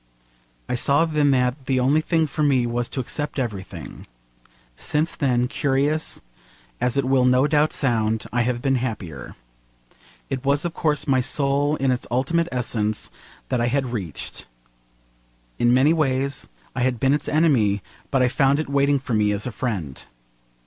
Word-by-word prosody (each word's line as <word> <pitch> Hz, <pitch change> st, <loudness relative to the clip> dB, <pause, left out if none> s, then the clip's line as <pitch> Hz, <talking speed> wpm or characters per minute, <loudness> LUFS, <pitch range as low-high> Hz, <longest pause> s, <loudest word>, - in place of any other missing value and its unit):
I -, -, -2 dB
saw 140 Hz, +6 st, +3 dB
then 150 Hz, -3 st, +2 dB
that 130 Hz, 0 st, +1 dB
the 130 Hz, -1 st, +2 dB
only 140 Hz, +5 st, +3 dB
thing 160 Hz, 0 st, +1 dB
for 155 Hz, +1 st, -4 dB
me 135 Hz, -4 st, +3 dB
was 120 Hz, 0 st, -2 dB
to -, -, -4 dB
accept 145 Hz, +5 st, -2 dB
everything. 105 Hz, -8 st, -6 dB, 0.7 s
Since 155 Hz, -, -1 dB
then 125 Hz, -3 st, +1 dB
curious 140 Hz, +3 st, 0 dB, 0.6 s
as 125 Hz, +2 st, +1 dB
it 140 Hz, -, +2 dB
will 130 Hz, -1 st, +3 dB
no 125 Hz, +2 st, +4 dB
doubt 150 Hz, 0 st, +2 dB
sound 110 Hz, -4 st, 0 dB
I 120 Hz, -, +2 dB
have 120 Hz, 0 st, -1 dB
been 135 Hz, -2 st, +2 dB
happier. 100 Hz, -, -5 dB, 0.9 s
It 130 Hz, -1 st, -4 dB
was 140 Hz, +3 st, +1 dB
of 170 Hz, -, -2 dB
course 150 Hz, -4 st, 0 dB
my 130 Hz, -3 st, +2 dB
soul 140 Hz, +3 st, +1 dB
in 135 Hz, -3 st, +1 dB
its 125 Hz, -, -2 dB
ultimate 165 Hz, +7 st, 0 dB
essence 110 Hz, -4 st, -1 dB, 0.4 s
that 125 Hz, -2 st, 0 dB
I 120 Hz, -, +2 dB
had 130 Hz, -1 st, -1 dB
reached. 95 Hz, -10 st, -6 dB, 1.1 s
In 120 Hz, 0 st, +4 dB
many 135 Hz, +5 st, +4 dB
ways 140 Hz, -3 st, 0 dB, 0.3 s
I 125 Hz, -, -2 dB
had 125 Hz, -1 st, 0 dB
been 135 Hz, +3 st, +3 dB
its 150 Hz, 0 st, -1 dB
enemy, 125 Hz, -, +2 dB, 0.3 s
but 135 Hz, -2 st, +2 dB
I -, -, +4 dB
found 135 Hz, +2 st, +2 dB
it 155 Hz, -, -3 dB
waiting 140 Hz, 0 st, +3 dB
for 130 Hz, -3 st, -5 dB
me 105 Hz, -1 st, +2 dB
as 100 Hz, 0 st, -2 dB
a 125 Hz, -, -3 dB
friend. 100 Hz, -, -4 dB
130 Hz, 170 wpm, -23 LUFS, 120-145 Hz, 1.1 s, no